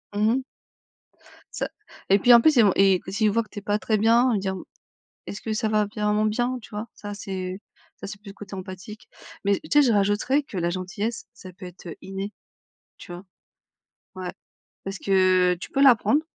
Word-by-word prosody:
Mmh 210 +2 +3
mh. 265 - -1 1.1
Ca - - -2 0.4
et 195 +1 +5
puis, 245 +4 +6
en 235 - +8
plus, 310 +3 +4
il 230 - +7
v 200 - +5
et 195 0 +5
quand 195 +3 -6
il 215 - +5
voit 230 +2 +1
que 215 - -22
tu - - -7
es - - -15
pas 205 +1 -1
très 215 0 0
bien, 230 +4 +4
il - - +1
va - - 0
dire: 190 0 -2 0.7
«Est-ce 200 - -6
que 220 - -4
ça 215 0 0
va 215 -1 +2
vraiment 210 0 0
bien?» 240 +4 0
Tu - - -14
vois? 210 +2 -5
Ça, 205 0 -7
c'est 190 -1 -5 0.4
ça - - -8
c'est 205 0 -9
plus 210 - -13
le - - -12
côté 200 -1 -10
empathique. 190 +3 -9 0.4
Mais 200 0 +2
tu 310 - -13
sais? 295 - +7
Je 245 -5 +3
rajouterais 205 +8 +2
que 210 - -10
la 170 0 0
gentillesse 195 +5 -4
ça 185 -5 -12
peut 180 +1 -11
être, 180 0 -13
heu, 170 - -6
inné, 195 +2 -5 0.7
tu - - -12
vois? 175 +1 -8 0.9
Ouais, 185 -1 -5 0.5
parce 195 0 -5
que 185 -2 +3
tu - - -7
peux 275 - +1
l'apprendre, 275 +3 +5
205 Hz, 215 wpm, -24 LUFS, 190-220 Hz, 1.1 s, en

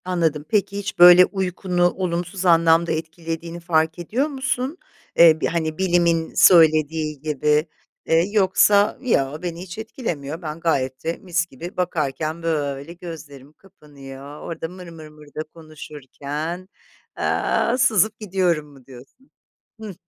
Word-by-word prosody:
Anladım, 165 -5 -1
peki 200 -2 0
hiç 200 -1 -5
böyle 180 +1 +9
uykunu 180 -2 -1
olumsuz 180 +1 -3
anlamda 165 -1 +4
etkilediğini 165 +1 -5
fark 160 -1 0
ediyor 235 - -1
musun? 265 +1 -3 0.4
Eee, 160 -2 +7
bir - - +1
hani 160 -2 -2
bilimin 170 -3 +1
söylediği 155 -3 +4
gibi, 150 +1 0 0.4
ııı, 165 +1 +4
yoksa 205 0 +3
yo, 150 - 0
beni 175 -1 -5
hiç 185 0 -9
etkilemiyor. 170 - -5
Ben 155 -1 -6
gayet 130 -6 -1
de 165 +1 -2
mis 175 -2 -1
gibi 170 +3 -10
bakarken 160 -2 -2
böyle 145 -1 -3
gözlerim 155 -5 -11
kapanıyor. 145 -6 -13
Orada 165 -1 -6
mır 180 +1 -11
mır 160 -2 -11
mır 150 0 -16
da 155 +2 -6
konuşurken, 155 +2 -7 0.5
aaa, 240 - 0
sızıp 220 -4 +2
gidiyorum 180 -7 -1
mu 135 -3 -18
diyorsun? 135 - -16 0.5
Hıh. 215 -3 -7
165 Hz, 130 wpm, -21 LUFS, 150-185 Hz, 0.5 s, böyle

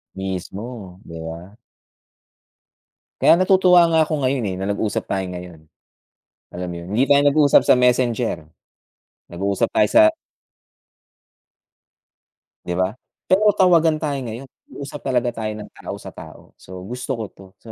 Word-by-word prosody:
Mismo 95 +1 -7
'di 85 -1 -9
ba. 85 +6 -9 1.6
Kaya - - +6
natutuwa 180 -1 +5
nga 160 -1 +3
ako 155 -1 -3
ngayon, 130 -2 0
eh, 95 -2 -3
na - - -2
nag-usap 100 0 -2
tayo 95 -1 -1
ngayon. 90 -3 -9 0.9
Alam 90 0 -5
mo - - -7
yun, 85 - -10
hindi 125 - +3
tayo 140 +1 +4
nag-usap 145 0 +5
sa - - +6
messenger. 125 -7 0 0.8
Nag-uusap 100 +3 -1
tayo 105 - +3
sa - - +6 2.6
'Di 90 - -3
ba? 95 +3 -1 0.3
Pero 210 +3 +4
tawagan 165 -5 +3
tayo 145 -3 -2
ngayon, 120 +3 -7 0.2
nag-uusap 140 +1 -8
talaga 125 -2 0
tayo 110 -1 -3
ng 105 - -10
tao - - -7
sa - - -10
tao. - - -13
So 90 0 -11
gusto 125 +3 -6
ko 110 - -3
'to. 95 - -17
So, 115 - -12
115 Hz, 140 wpm, -21 LUFS, 95-145 Hz, 2.6 s, Kaya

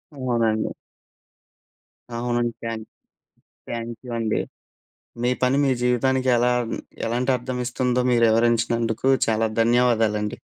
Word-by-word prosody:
అవునండి. 115 -5 0 1.5
అవునండి. 120 0 -1
Thank 115 -1 -5 0.8
thank 115 0 -4
you - - -7
అండి. 110 -2 0 0.8
మీ 125 - +2
పని 130 +2 +3
మీ 135 - +3
జీవితానికి 130 +1 +1
ఎలా 125 +1 +3 0.5
ఎలాంటి 125 +3 0
అర్థం 125 +1 -5
ఇస్తుందో 125 0 0
మీరు 120 -1 +3
వివరించినందుకు 115 +1 +1 0.2
చాలా 110 0 +2
ధన్యవాదాలండి. 115 -3 +2
120 Hz, 105 wpm, -23 LUFS, 115-125 Hz, 1.5 s, పని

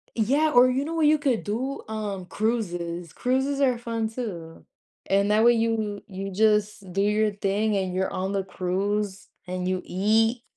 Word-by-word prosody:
Yeah, 280 +8 +2
or, 250 +1 +7
you 265 +3 0
know 330 - -4
what 320 -2 +2
you 305 0 +5
could 270 -6 0
do? 255 +7 -3
Um, 210 -4 -4
cruises. 175 -6 -2
Cruises 265 +3 0
are 255 -3 +3
fun, 230 -2 -3
too. 180 -9 -7 0.4
And, 200 +1 +2
that 215 +1 +4
way 240 0 +7
you 225 -3 -1
you 195 0 -6
just 210 -2 +1
do 195 - +1
your 210 +1 +2
thing, 205 +2 0
and 185 -1 -2
you're 190 +1 -1
on 190 +1 -2
the 195 -1 -1
cruise, 195 +2 -2 0.2
and 180 0 -3
you 185 0 -1
eat. 225 +5 +1
210 Hz, 175 wpm, -25 LUFS, 190-235 Hz, 0.4 s, or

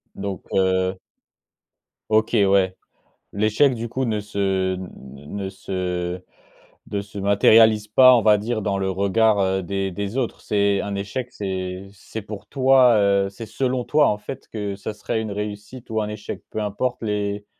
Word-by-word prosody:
Donc, 100 -1 -5
heu 95 0 +1 1.1
OK, 110 +1 +2
ouais. 95 -1 +3 0.6
L'échec 110 +7 +3
du 115 0 -5
coup 130 +3 -2
ne 110 -3 -1
se, 95 -2 -1
n 95 0 -7 0.3
n 75 +7 -9
ne 100 -1 -3
se 90 -2 -4 0.7
ne 100 - -1
se 100 0 -9
matérialise 105 +2 +5
pas, 130 +4 +7
on 115 - +2
va 105 -1 +5
dire, 110 0 -2
dans 100 -1 -1
le 95 0 -1
regard, 100 +3 +2
heu, 95 0 +1
des 95 +1 -2
des 100 +6 -4
autres? 125 -4 -2
C'est 100 -1 +1
un 100 -1 -4
échec, 105 +6 -4
c'est, 95 -2 -4
c'est 105 +2 -8
pour 105 -1 -9
toi, 130 -3 +5
heu, 100 -1 +2
c'est 100 +4 -9
selon 125 +3 -1
toi 150 +3 +3
en 105 - +1
fait 130 +5 -9
que 105 -2 -4
ce 100 +2 -6
serait 105 +1 -3
une 110 - -4
réussite 105 +4 -6
ou 110 -1 0
un 105 - -2
échec, 105 0 -7
peu - - -4
importe 110 +4 -2
les 105 -1 -2
105 Hz, 175 wpm, -22 LUFS, 95-110 Hz, 1.1 s, pas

